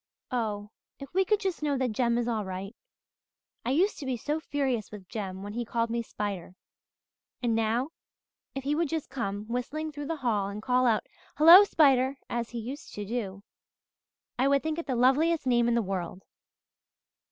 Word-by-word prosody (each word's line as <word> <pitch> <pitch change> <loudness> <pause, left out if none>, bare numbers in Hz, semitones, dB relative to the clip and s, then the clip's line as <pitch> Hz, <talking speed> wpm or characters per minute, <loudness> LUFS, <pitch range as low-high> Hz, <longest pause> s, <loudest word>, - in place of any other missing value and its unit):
Oh, 210 -4 -2 0.3
if 275 +1 -10
we 380 +1 +4
could 420 +2 +2
just 380 -6 -2
know 290 -2 0
that 255 -2 0
Jem 235 +1 +1
is 240 0 0
all 225 -3 0
right! 190 +3 -6 0.9
I - - -2
used 350 +10 +2
to 285 - -6
be 255 -2 -1
so 300 +7 -2
furious 270 -8 -1
with 200 -3 -10
Jem 195 -3 -5
when 205 0 -6
he 240 +2 -2
called 230 0 -1
me 235 0 0
Spider. 200 -5 -5 0.9
And 235 -2 +2
now, 225 +5 +1 0.7
if 270 - -4
he 285 +2 0
would 325 0 0
just 320 -1 -3
come 210 -6 -3
whistling 285 +7 -3
through 290 -1 -6
the 330 - -1
hall 205 -4 +1
and 200 +1 -6
call 250 +3 +2
out, 220 -2 +2 0.3
'Hello, 335 +6 +10
Spider,' 270 -6 +4
as 235 -1 -2
he 240 - -6
used 265 +8 -7
to 205 - -4
do, 200 -3 -4 1.0
I 265 - +4
would 280 0 +3
think 315 +1 -2
it 335 - -6
the 260 - 0
loveliest 285 +6 +3
name 240 -2 +3
in 240 - +2
the 235 - +2
world." 190 -1 -4
245 Hz, 190 wpm, -28 LUFS, 215-285 Hz, 1.0 s, Hello